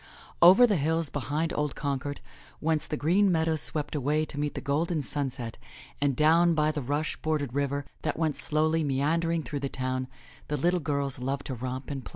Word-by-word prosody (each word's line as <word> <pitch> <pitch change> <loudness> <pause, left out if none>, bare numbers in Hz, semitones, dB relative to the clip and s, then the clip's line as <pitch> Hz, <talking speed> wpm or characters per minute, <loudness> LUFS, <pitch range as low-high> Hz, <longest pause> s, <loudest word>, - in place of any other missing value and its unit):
Over 190 +8 +9
the 210 -5 +2
hills 160 +1 +1
behind 150 +4 -2
old 150 -1 -1
Concord, 145 0 -3 0.4
whence 160 -1 0
the 150 - -3
green 185 +7 +3
meadows 160 -2 +1
swept 150 -2 -2
away 150 +2 +1
to 145 - -6
meet 145 0 -2
the - - -2
golden 155 +3 -1
sunset, 130 -5 -3 0.4
and 140 -2 +2
down 165 +4 +4
by 155 0 +2
the 150 - -3
rush 145 +4 -2
bordered 150 -5 -2
river 140 0 -1 0.2
that 155 - -2
went 155 -3 0
slowly 155 +2 +1
meandering 160 +4 0
through 145 - -4
the 140 0 -3
town, 130 -1 -2 0.4
the 150 - -1
little 175 +3 +2
girls 140 -3 -1
loved 135 +2 -3
to 135 - -4
romp 130 +3 -5
and 135 -2 -4
play. - - -9
150 Hz, 190 wpm, -28 LUFS, 140-160 Hz, 0.4 s, Over